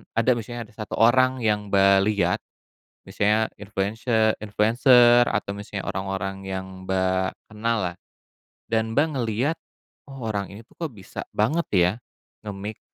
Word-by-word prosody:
ada 115 +2 +2
maksudnya 120 +1 -5
ada - - -21
1 110 -2 -5
orang 130 +3 +4
yang 105 -1 +1
Mbak 100 0 +5
lihat, 100 -4 +1 0.7
misalnya 105 +2 +1
influense 105 +3 -4 0.4
influenser 120 +3 +5
atau 105 -3 -1
misalnya 100 -1 -6
orang-orang 95 0 -3
yang 95 0 -4 0.2
Mbak, 95 0 0 0.2
kenal 115 +2 -1
lah 85 - -14 0.7
dan 110 +1 -1
Mbak 145 +3 +4
ngeliat, 125 +4 0 0.6
"Oh, 135 -3 -8
orang 100 -3 -2
ini 105 +3 -11
tuh - - -25
kok 165 -3 -4
bisa 95 - -8 0.2
banget 150 +11 +1
ya 90 0 +4 0.5
nge-mix, 105 0 -7
105 Hz, 140 wpm, -24 LUFS, 95-115 Hz, 0.7 s, Mbak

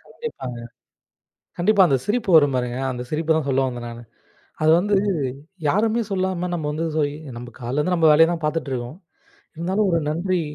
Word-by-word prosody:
கண்டிப்பாங்க. 130 - -6 1.0
கண்டிப்பா 195 +3 +4
அந்தச் 135 -4 0
சிரிப்பு 215 -1 0
வரும் 145 -3 +5
பாருங்க. 125 0 -2
அந்தச் 125 -1 -6
சிரிப்பு 160 +1 +1
தான் 155 -3 -1
சொல்ல 135 0 +2
வந்தேன் 120 -2 -5
நானு. 120 0 -9 0.6
அது 155 - +5
வந்து 205 +3 +1 0.7
யாருமே 220 +8 +2
சொல்லாம 185 -2 -1
நம்ம 160 -3 -3
வந்து 160 +2 -2
சேரி 145 -2 +1 0.2
நம்ம 120 0 -8
காலையில 125 +4 -3
இருந்து 180 +5 +1
நம்ம 165 -2 +4
வேலைய 165 +2 +6
தான் 165 -2 -4
பாத்துட்டு 150 -1 -1
இருக்கோம். 125 +4 -4 0.6
இருந்தாலும் 190 +5 0
ஒரு 165 - +2
நன்றி 180 +3 0
160 Hz, 170 wpm, -22 LUFS, 130-185 Hz, 1.0 s, வேலைய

